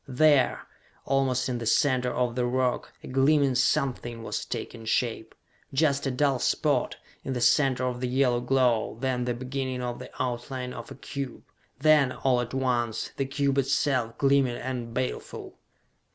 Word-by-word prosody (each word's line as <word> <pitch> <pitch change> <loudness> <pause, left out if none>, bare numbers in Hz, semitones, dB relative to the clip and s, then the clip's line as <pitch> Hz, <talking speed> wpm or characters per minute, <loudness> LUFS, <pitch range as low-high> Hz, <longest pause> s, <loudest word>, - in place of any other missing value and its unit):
There, 140 0 +3 0.4
almost 135 -2 +1
in 125 -2 -2
the 115 - -4
center 125 0 +2
of 125 -1 0
the 125 0 0
rock, 125 0 0
a - - -8
gleaming 135 +1 +3
something 130 -3 0
was - - -3
taking 115 -2 -6
shape! 110 0 -1 0.4
Just 140 -1 +2
a - - +1
dull 135 0 +1
spot, 145 -2 +1 0.3
in 135 - -3
the 125 - -2
center 130 +1 +3
of 125 -1 -3
the 125 - 0
yellow 125 -1 +2
glow; 125 -4 +1
then 125 -1 -1
the 120 -1 -1
beginning 130 0 -3
of 120 -1 -4
the - - -9
outline 125 0 -3
of 115 - -8
a - - -9
cube. 135 -1 -6 0.3
Then, 150 -2 +4
all 125 -2 +1
at 120 - -5
once, 120 -4 -1
the 135 - 0
cube 140 0 0
itself, 135 -3 0
gleaming 135 -3 +3
and 120 -2 -4
baleful! 130 +2 -5
130 Hz, 165 wpm, -27 LUFS, 120-135 Hz, 0.4 s, Then